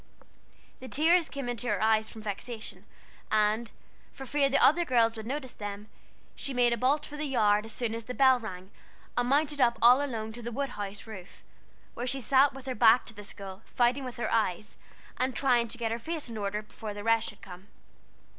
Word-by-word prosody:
The 260 - -9
tears 325 +5 +3
came 275 -3 -5
into 245 0 -4
her - - 0
eyes 220 0 +2
from 220 - -11
vexation; 215 +2 -6 0.4
and, 215 +2 +1 0.4
for 270 - -9
fear 280 +1 +2
the 275 - +3
other 340 +5 +5
girls 230 -6 +2
would 220 0 -7
notice 265 -1 -4
them, 205 0 -7 0.5
she 275 - -4
made 240 -1 +4
a - - +2
bolt 265 +6 +1
for 295 - -9
the 305 - -2
yard 210 -5 +2
as - - -11
soon 230 -1 -2
as 230 0 -5
the 250 - -6
bell 260 -2 +5
rang, 190 -4 -8 0.4
and 245 0 0
mounted 290 0 +2
up 235 -1 +4
all 250 +4 +6
alone 220 -5 -4
to 240 - -9
the 240 +1 -5
wood 275 +3 -2
house 205 -2 -6
roof, 195 -5 -11 0.5
where 245 - -4
she 270 +2 -1
sat 270 +3 +4
with 270 0 -11
her 260 - -2
back 230 +1 +5
to 230 - -10
the 205 -1 -10
school, 195 -1 -9
fighting 245 +3 +1
with 250 -2 -6
her 240 - -2
eyes, 215 -2 0 0.4
and 255 -1 -1
trying 245 -4 +2
to 230 - -7
get 230 -2 -2
her 230 - -2
face 315 +1 -5
in 230 - -7
order 210 0 -3
before 210 0 -8
the 205 - -6
rest 225 0 +2
should 210 - -15
come. 185 0 -11
235 Hz, 215 wpm, -29 LUFS, 215-265 Hz, 0.5 s, all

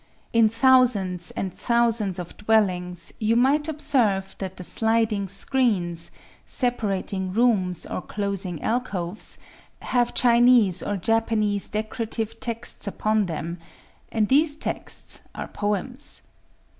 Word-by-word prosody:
In 230 -1 +5
thousands 225 -7 +3
and 190 -2 -3
thousands 230 -5 +1
of 180 -2 -7
dwellings, 180 -5 +1
you 220 +1 +2
might 280 +5 +3
observe 245 -11 0
that 190 -1 -5
the 180 - -5
sliding 220 0 +1
screens, 190 -5 0 0.3
separating 200 -6 -1
rooms 195 -5 +1
or - - -4
closing 195 -5 -3
alcoves, 210 -6 -3 0.5
have 245 -1 0
Chinese 235 -6 +4
or 205 - -2
Japanese 215 0 0
decorative 220 +1 -4
texts 230 -2 +2
upon 215 0 0
them;—and 170 +6 -5
these 290 +4 +4
texts - - -3 0.2
are - - -5
poems. 210 +7 -2
215 Hz, 105 wpm, -24 LUFS, 190-235 Hz, 0.5 s, In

